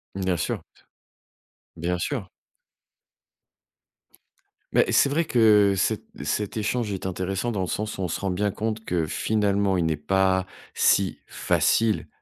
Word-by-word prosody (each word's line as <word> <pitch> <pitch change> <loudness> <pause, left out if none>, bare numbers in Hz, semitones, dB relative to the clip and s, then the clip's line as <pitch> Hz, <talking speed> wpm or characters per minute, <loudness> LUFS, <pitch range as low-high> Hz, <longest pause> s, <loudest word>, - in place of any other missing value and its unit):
Bien 95 -2 0
sûr. - - -2 1.1
Bien 85 +2 -2
sûr. 110 0 -3 2.5
Beh, - - +5
c'est - - +5
vrai 150 +5 +1
que 105 -7 +4
cet 95 - +1 0.2
cet 105 +1 -2
échange 110 +1 -1
est 95 -1 -5
intéressant 95 +5 -2
dans 100 - -2
le 90 - -1
sens 105 +5 -3
où - - -4
on 90 - -2
se - - -3
rend 100 -1 -2
bien 100 +3 0
compte 110 +2 -3
que, 85 -6 -1
finalement, 100 +2 +1
il 85 - +1
n'est 80 - +1
pas 95 +4 +1 0.3
si 95 -2 +2
facile 110 -2 +1
100 Hz, 140 wpm, -25 LUFS, 95-110 Hz, 2.5 s, Beh